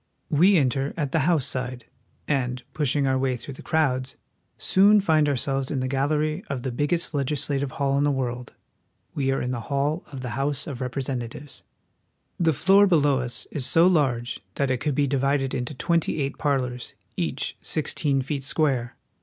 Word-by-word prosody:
We 180 +6 +5
enter 135 -1 0
at 145 -4 -2
the 160 0 +2
House 155 -7 +2
side, 125 -2 -3 0.4
and, 125 -3 -1
pushing 145 -2 +1
our 130 -1 +2
way 130 -1 0
through 140 - -8
the - - -11
crowds, 135 -5 0 0.4
soon 205 +2 +5
find 155 -6 +3
ourselves 135 0 -1
in 140 - -1
the 130 - -1
gallery 150 +5 0
of 135 -3 -4
the 130 - -2
biggest 150 +7 0
legislative 140 -1 -1
hall 140 0 +1
in - - +2
the 145 - +3
world. 125 -3 -3 0.6
We 135 -2 0
are 135 - 0
in 125 - -2
the 125 - -2
hall 145 +4 0
of 135 -3 -6
the 125 - -4
House 140 0 -1
of 135 -4 -6
Representatives. 130 +1 -4 0.8
The 165 -2 +3
floor 195 +7 +5
below 145 -6 +3
us 120 -1 -3
is 145 - -2
so 165 +1 +5
large 130 -9 +1 0.2
that 140 -2 0
it 130 - +1
could 150 0 -1
be 145 - +2
divided 135 0 0
into 125 +4 -3
twenty 170 +2 0
eight 140 -1 -2
par 145 -3 +2
lors, 125 -1 -6 0.2
each - - -3
sixteen 135 -3 -1
feet 140 0 -3
square. 135 -4 0
140 Hz, 180 wpm, -25 LUFS, 130-150 Hz, 0.8 s, We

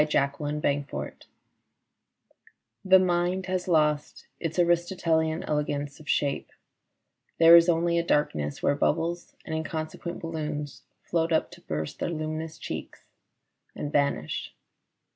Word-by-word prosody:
Fatigue 145 -2 +2
39 145 -1 -1
FATIGUE - - -7 1.6
THE 190 0 +7
mind 180 0 +1
has 185 -1 -2
lost 150 -3 +1
its 165 0 -3
Aristotelian 170 -2 +1
elegance 145 -1 -2
of 155 - -12
shape: 140 -1 0 0.9
there 165 0 +9
is 170 +1 +7
only 170 0 +2
a - - 0
darkness 75 - 0
where - - +4
bubbles 165 +4 -1
and - - -5
inconsequent 160 +1 -4
balloons 150 -3 -4 0.2
float 165 -1 0
up 160 - +1
to 175 0 -13
burst 75 - -4
their - - -1
luminous 155 0 -4
cheeks - - -7 0.7
and 145 - -4
vanish. 140 - -1
160 Hz, 125 wpm, -27 LUFS, 150-170 Hz, 1.6 s, there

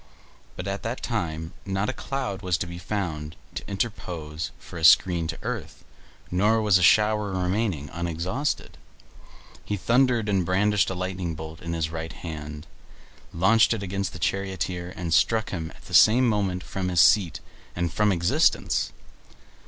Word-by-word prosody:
But 90 - -6
at 100 0 -3
that 115 +3 -4
time 80 -8 -3
not 100 +1 -1
a - - -1
cloud 130 -8 -4
was 90 -3 0
to - - -3
be 85 0 -8
found 80 -5 -4 0.2
to - - -5
interpose 85 -7 -4
for 85 - -10
a - - -7
screen 85 0 +5
to 80 - -4
earth, - - -5 0.5
nor 105 +5 +3
was 105 -4 +4
a - - -2
shower 105 +1 +4
remaining 90 -4 -1
unexhausted. 85 - -3 0.8
He 105 - -2
thundered, 120 +1 +2
and 100 -3 +2
brandishing 95 +3 +2
a 95 - -4
lightning 90 -3 -3
bolt 80 0 -8
in 85 0 -4
his 80 -1 -1
right 80 0 -5
hand 75 -2 -7 0.7
launched 110 +7 +4
it 105 - -5
against 95 0 -2
the - - -7
charioteer, 90 -1 -2
and 85 -2 -2
struck 110 +3 +2
him 80 -3 -4
at - - -18
the - - -11
same 120 +4 +6
moment 100 -5 0
from 95 -1 -4
his 90 -1 +1
seat 85 +1 +5 0.4
and 85 -1 -1
from 105 -1 +3
existence! 85 -2 +2
90 Hz, 160 wpm, -25 LUFS, 85-105 Hz, 0.8 s, same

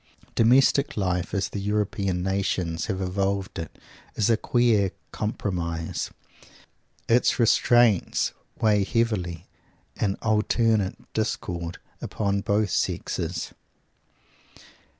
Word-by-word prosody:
Domestic 135 +4 +4
life 90 -3 -1
as 95 -2 -1
the 100 - -4
European 100 -2 -1
nations 90 -4 -1
have 95 -3 -2
evolved 95 +1 -1
it 80 - -7 0.4
is 110 +2 +2
a - - +5
queer 110 -4 +2 0.2
compromise. 85 -6 -3 1.0
Its 120 +2 +3
restraints 120 -3 +3 0.3
weigh 105 -2 +3
heavily, 95 -6 -1 0.5
in 100 -2 0
alternate 110 -2 +2 0.2
discord, 85 -6 -3 0.2
upon 100 -1 -1
both 100 -1 +1
sexes. 85 +1 -2
100 Hz, 90 wpm, -25 LUFS, 90-110 Hz, 1.0 s, a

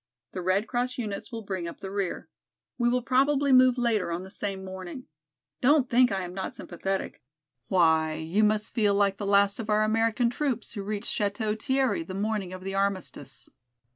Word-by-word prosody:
The 185 - -5
Red 185 +4 +1
Cross 250 +1 -2
units 210 -1 -5
will 225 -1 -6
bring 190 -4 -4
up 170 - -7
the 190 - -7
rear. 200 -2 -3 0.5
We 240 0 +3
will 250 0 +1
probably 275 +2 +2
move 255 -1 +6
later 225 -7 +1
on 170 +2 -3
the 190 - -11
same 195 -2 -4
morning. 190 +5 -7 0.6
Don't 265 0 +4
think 245 +1 +5
I 195 -1 -1
am 180 0 -7
not 190 0 -4
sympathetic; 190 +2 -4 0.5
why 160 -3 +3
you 165 +7 0
must 210 0 +1
feel 210 -3 +2
like 200 -1 +2
the 205 - -4
last 200 0 +3
of 220 -1 -5
our 210 0 +3
American 225 +2 +2
troops 250 -4 -2
who 205 - -5
reached 205 +1 -2
Château 210 +1 -1
Thierry 265 -7 +1
the 185 +3 -7
morning 205 -2 -2
of 185 0 -8
the 195 0 -4
armistice. 195 -2 -2
205 Hz, 190 wpm, -27 LUFS, 190-240 Hz, 0.6 s, move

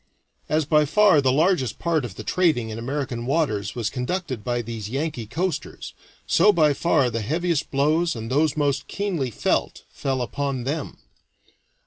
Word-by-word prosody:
As 155 0 +1
by 150 +1 +4
far 195 -1 +5
the 130 -1 +3
largest 150 - +2
part 165 -4 0
of 110 -7 -6
the - - -7
trading 155 -11 +1
in 110 - -5
American 130 -1 -3
waters 130 -10 0
was 115 -3 -2
conducted 130 - -3
by 120 -1 -1
these 110 -2 -6
Yankee 135 -3 -3
coasters, 170 - -4 0.3
so 210 - +5
by 155 -6 +3
far 140 -4 +2
the 115 0 -2
heaviest 165 +6 -1
blows, 155 +4 +1
and 115 +1 -6
those 150 +2 +2
most 140 -2 0
keenly 185 -10 -2
felt, 115 - -1
fell 130 -2 -2
upon 140 0 -3
them. 145 +3 -4
140 Hz, 160 wpm, -23 LUFS, 120-160 Hz, 0.3 s, far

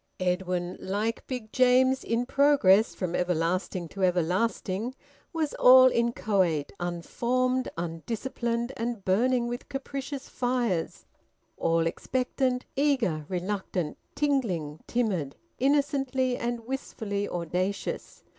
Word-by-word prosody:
Edwin, 180 -1 -1
like 210 +4 -2
Big 245 -5 -5
James 255 +1 +4
in 230 +1 0
progress 265 -7 +4
from 180 -3 -3
everlasting 180 +1 -1
to 195 +3 -4
everlasting, 185 +5 0 0.4
was 320 -3 -1
all 255 +1 +9
inchoate, 200 -10 +1
unformed, 245 +9 -1
undisciplined, 230 +8 -3
and 230 -3 -3
burning 240 +5 +2
with 240 0 -5
capricious 275 0 -5
fires; 245 -9 -1 0.5
all 165 0 +1
expectant, 255 +7 -1
eager, 245 - +1
reluctant, 185 -3 -2 0.2
tingling, 195 - 0
timid, 190 - -1 0.2
innocently 270 -2 +1
and 240 -1 -3
wistfully 220 -5 -4
audacious. 180 +3 -3
230 Hz, 100 wpm, -28 LUFS, 180-255 Hz, 0.5 s, all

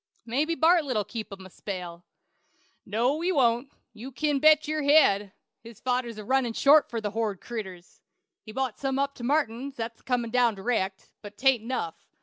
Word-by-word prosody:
Mabbe 290 +8 0
Bartlett'll 310 -9 +3
keep 225 -3 -7
him 190 -1 -9
a - - -11
spell." 180 -4 -7 0.8
"No, 245 +9 0
he 360 +2 +1
won't; 250 -3 +2 0.2
you 235 +5 -9
kin 290 +1 0
bet 310 +1 +5
your 310 0 -1
head. 210 -10 +4 0.3
His 230 -1 -13
fodder's 245 -3 -2
a 215 - -7
runnin' 260 -2 +1
short 290 +5 +5
for 230 - -3
the 210 -2 -3
hornid 215 -3 -2
critters. 190 -7 -8 0.4
He's 215 - -12
bought 265 -4 -2
some 270 -1 -1
up 280 0 0
to 245 - -11
Martin's, 270 -1 -1
that's 230 0 -6
a - - -33
comin' 240 -3 -1
down 245 -3 +3
dyrect; 195 -2 -2
but 205 -1 -11
'tain't 265 -2 +3
enough. 230 -8 -5
240 Hz, 180 wpm, -27 LUFS, 215-275 Hz, 0.8 s, bet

